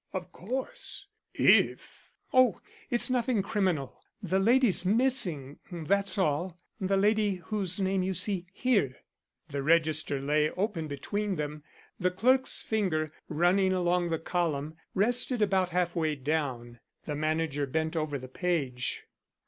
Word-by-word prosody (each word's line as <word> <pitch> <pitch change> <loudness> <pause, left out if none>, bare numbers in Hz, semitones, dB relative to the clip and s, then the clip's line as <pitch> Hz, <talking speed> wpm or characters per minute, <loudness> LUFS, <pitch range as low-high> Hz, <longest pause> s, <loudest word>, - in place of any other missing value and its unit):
"Of 180 -2 -5
course, 265 - -5 0.3
if - - +2
" - - -35
"Oh! 255 -6 +5 0.3
it's 240 +1 +2
nothing 240 -4 +1
criminal. 185 - -1 0.2
The 190 0 +1
lady's 230 -2 +3
missing, 190 - 0
that's 195 +5 0
all; 175 0 0 0.2
the 195 0 +1
lady 210 0 +2
whose 185 +1 -2
name 190 0 +1
you 185 +1 -1
see 185 0 0
here." 200 - +1 0.5
The 140 -1 -3
register 155 -1 +2
lay 150 +2 +2
open 185 -4 -2
between 200 +8 -2
them; 150 -1 -4 0.4
the 180 - +2
clerk's 255 +8 +2
finger, 170 -8 0 0.2
running 180 +4 +3
along 175 -1 +1
the 165 - 0
column, 160 -3 -2 0.2
rested 245 +4 +2
about 190 -3 +2
half 180 0 0
way 160 -3 0
down. 130 -5 -3 0.3
The 150 - -3
manager 155 -1 -1
bent 160 +4 -1
over 155 -3 -1
the 130 -1 -9
page. 135 -5 -2
180 Hz, 135 wpm, -29 LUFS, 155-200 Hz, 0.5 s, Oh